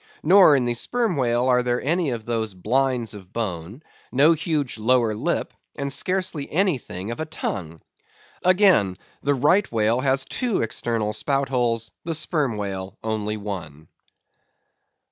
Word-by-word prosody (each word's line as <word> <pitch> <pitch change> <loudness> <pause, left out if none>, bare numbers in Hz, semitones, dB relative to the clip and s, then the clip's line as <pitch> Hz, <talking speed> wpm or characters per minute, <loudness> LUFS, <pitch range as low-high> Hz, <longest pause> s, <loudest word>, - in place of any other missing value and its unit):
Nor 180 -2 +7
in 130 -3 +1
the 120 - 0
Sperm 225 - -1
Whale 120 -2 +1
are 125 -1 +4
there 125 0 0
any 170 +1 0
of 115 -3 -4
those 110 -4 -2
blinds 125 +4 0
of 95 -3 -11
bone; 105 - -4 0.3
no 145 +6 +5
huge 150 -7 -2
lower 115 0 +2
lip; 105 - -2 0.2
and 140 -1 -1
scarcely 180 -1 -1
anything 140 - -1
of 120 - -6
a 160 - -2
tongue. 85 - -5 0.6
Again, 180 - +4 0.2
the 145 0 +1
Right 165 +10 +3
Whale 115 +1 +2
has 135 0 +1
two 245 - -1
external 115 -1 -2
spout 135 +5 -1
holes, 120 -3 0
the 165 -1 -2
Sperm 150 -7 -1
Whale 95 -2 -5
only 110 -1 -2
one. 85 -8 -7
125 Hz, 145 wpm, -23 LUFS, 105-150 Hz, 0.6 s, Nor